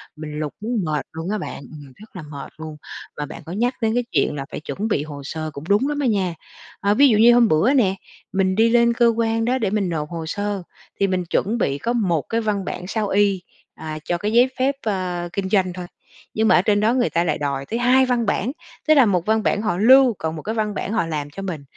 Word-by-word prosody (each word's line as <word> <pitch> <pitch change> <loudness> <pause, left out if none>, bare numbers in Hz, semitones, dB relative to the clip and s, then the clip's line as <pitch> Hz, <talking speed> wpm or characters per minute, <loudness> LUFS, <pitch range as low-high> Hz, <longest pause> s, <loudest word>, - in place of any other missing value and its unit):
mình 150 -1 -7
lục 150 -2 -3
muốn 225 0 -1
mệt 150 -2 -2
luôn 160 +3 -5
á 215 - 0
bạn, - - -6
ừm, 145 -4 -12
rất 215 0 -16
là 180 - -6
mệt 145 -2 -9
luôn. 155 -1 -8 0.4
Và 150 - -3
bạn 145 - -9
có 165 - -8
nhắc 240 +7 0
đến 220 -1 +1
cái 245 +1 +1
chuyện 145 0 +1
là 140 -1 -4
phải - - -5
chuẩn 195 +7 -4
bị 150 -9 0
hồ 145 -2 -8
sơ 155 +3 -5
cũng 140 - -8
đúng 210 +7 +3
lắm 295 0 -2
á 280 - +1
nha. 195 -6 0 0.5
A, 200 0 +3
ví 280 +6 +6
dụ 220 - +3
như 235 +3 +7
hôm 240 -1 +5
bữa 200 - +3
nè, 205 -9 +3 0.4
mình 190 -1 +1
đi 225 +2 +4
lên 235 0 +4
cơ 235 0 +3
quan 225 0 0
đó 250 +2 +1
để 220 -6 0
mình 200 -3 0
nộp 150 -3 -3
hồ 165 -2 -5
sơ, 205 +3 -3 0.4
thì 200 - +3
mình 185 -1 -1
chuẩn 205 +6 0
bị 140 -10 0
có 235 +11 -2
một 185 -10 +1
cái 230 0 0
văn 205 -3 -1
bản 180 - -5
sao 215 +1 -1
y, 200 -1 +2 0.3
à, 155 -1 -6
cho 175 - 0
cái 205 +5 -2
giấy 245 +2 +5
phép, 270 +2 +1
ơ, 180 -4 -2
kinh 195 -1 -2
doanh 190 -3 +2
thôi, 180 0 -6 0.5
nhưng 220 0 +1
mà - - +5
ở 180 - +5
trên 205 +1 +2
đó 220 +3 +2
người 250 -2 +1
ta 170 - +1
lại 155 -3 0
đòi 140 -2 -3
tới 230 +10 -3
2 255 +2 +4
văn 245 -2 0
bản, 210 +3 0 0.4
tức 310 - +7
là 275 -5 +6
1 180 -5 +1
văn 220 0 +1
bản 210 - +1
họ 215 -5 -1
lưu, 255 +4 +6
còn 160 0 -3
một 155 - -6
cái 220 +6 -4
văn 215 -2 -1
bản 200 - -4
họ 225 -6 +1
làm 150 -3 -4
cho 195 - -8
mình, 175 -7 -5
200 Hz, 265 wpm, -21 LUFS, 165-225 Hz, 0.5 s, như